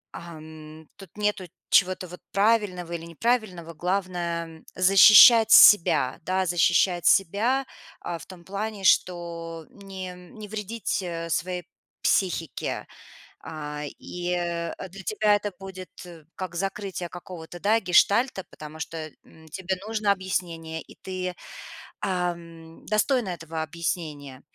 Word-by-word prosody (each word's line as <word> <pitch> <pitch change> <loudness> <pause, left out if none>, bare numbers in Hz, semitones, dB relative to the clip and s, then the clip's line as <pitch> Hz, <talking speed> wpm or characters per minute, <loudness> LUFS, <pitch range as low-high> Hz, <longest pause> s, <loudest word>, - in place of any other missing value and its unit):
ам, 155 -1 -11
тут 195 -4 -12
нету 210 -3 -1 0.2
чего-то 185 0 +3
вот 180 +1 -11
правильного 200 -4 +1
или 170 -1 -5
неправильного. 180 -2 -2
Главное, 175 -1 -2
м, - - -22
защищать 210 +4 +8
себя, 165 -9 +7
да, 185 +2 -1
защищать 175 +1 +2
себя, 220 +9 +2 0.3
а, 170 -1 -5
в - - -12
том 180 -2 -13
плане, 200 +1 -5
что 170 -3 0
не 190 -2 -8
не 180 +4 -12
вредить, 215 +1 -3
э, 170 -2 -5
своей 180 +1 -2 0.4
психике. 170 -5 -1 0.6
А, 150 -1 -6 0.2
и, 175 0 -5
э, 170 -1 -2 0.2
для 190 +2 -11
тебя 210 +1 +2
это 205 0 -3
будет 185 -1 -9 0.4
как 185 -2 -6
закрытие 195 -1 -4
какого-то, 175 -1 -10
да, 220 +3 +3
гештальта, 200 +4 +3
потому 155 +1 -11
что, 160 -1 -6
м, 160 0 -18
тебе 190 +3 -3
нужно 215 -2 0
объяснение, 170 -4 -3
и - - -15
ты, 185 -1 -5 0.6
ам, 170 -4 -4
достойна 215 +1 +1
этого 165 -2 -5
объяснения. 155 -4 -5
180 Hz, 120 wpm, -25 LUFS, 165-195 Hz, 0.6 s, защищать